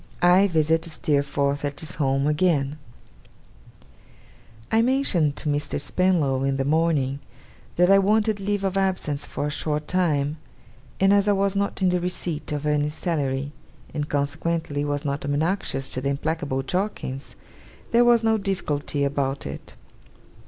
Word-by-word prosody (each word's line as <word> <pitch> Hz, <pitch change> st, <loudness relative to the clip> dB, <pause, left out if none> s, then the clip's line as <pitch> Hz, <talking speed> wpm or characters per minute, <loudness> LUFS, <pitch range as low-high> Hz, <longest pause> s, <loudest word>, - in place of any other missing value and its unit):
I 180 Hz, +3 st, +5 dB
VISIT 160 Hz, -1 st, +1 dB
STEERFORTH 140 Hz, -3 st, 0 dB
AT 145 Hz, 0 st, -3 dB
HIS 160 Hz, +2 st, -2 dB
HOME, 135 Hz, 0 st, +1 dB
AGAIN 150 Hz, -2 st, +1 dB, 1.9 s
I 225 Hz, -, +4 dB
mentioned 230 Hz, -, +2 dB
to 155 Hz, -, -5 dB
Mr. 145 Hz, 0 st, -1 dB
Spenlow 145 Hz, -5 st, +1 dB
in 135 Hz, 0 st, 0 dB
the 135 Hz, -, -1 dB
morning, 145 Hz, -3 st, +1 dB, 0.6 s
that 180 Hz, +2 st, +4 dB
I 195 Hz, -, +7 dB
wanted 210 Hz, +1 st, +2 dB
leave 200 Hz, 0 st, -1 dB
of 195 Hz, 0 st, 0 dB
absence 185 Hz, -7 st, -1 dB
for -, -, -3 dB
a 150 Hz, -, -2 dB
short 150 Hz, 0 st, -2 dB
time; 155 Hz, -5 st, +1 dB, 0.6 s
and 195 Hz, +1 st, +5 dB
as 200 Hz, 0 st, +3 dB
I 205 Hz, -, +4 dB
was 195 Hz, 0 st, +1 dB
not 200 Hz, -1 st, -1 dB
in 185 Hz, -, +4 dB
the 180 Hz, 0 st, +1 dB
receipt 175 Hz, -4 st, -3 dB
of 150 Hz, 0 st, -3 dB
any 150 Hz, 0 st, +1 dB
salary, 145 Hz, -4 st, -2 dB, 0.4 s
and 150 Hz, 0 st, -3 dB
consequently 145 Hz, +1 st, -1 dB
was 145 Hz, 0 st, -2 dB
not 140 Hz, 0 st, -2 dB
obnoxious 145 Hz, -1 st, -1 dB
to 130 Hz, -, -1 dB
the 140 Hz, -, -1 dB
implacable 140 Hz, -2 st, -2 dB
Jorkins, 180 Hz, -5 st, -3 dB, 0.6 s
there 235 Hz, +1 st, +5 dB
was 240 Hz, -1 st, +4 dB
no 220 Hz, -1 st, +2 dB
difficulty 155 Hz, -7 st, -2 dB
about 140 Hz, -1 st, -1 dB
it. 70 Hz, -, -8 dB
150 Hz, 150 wpm, -24 LUFS, 140-185 Hz, 1.9 s, I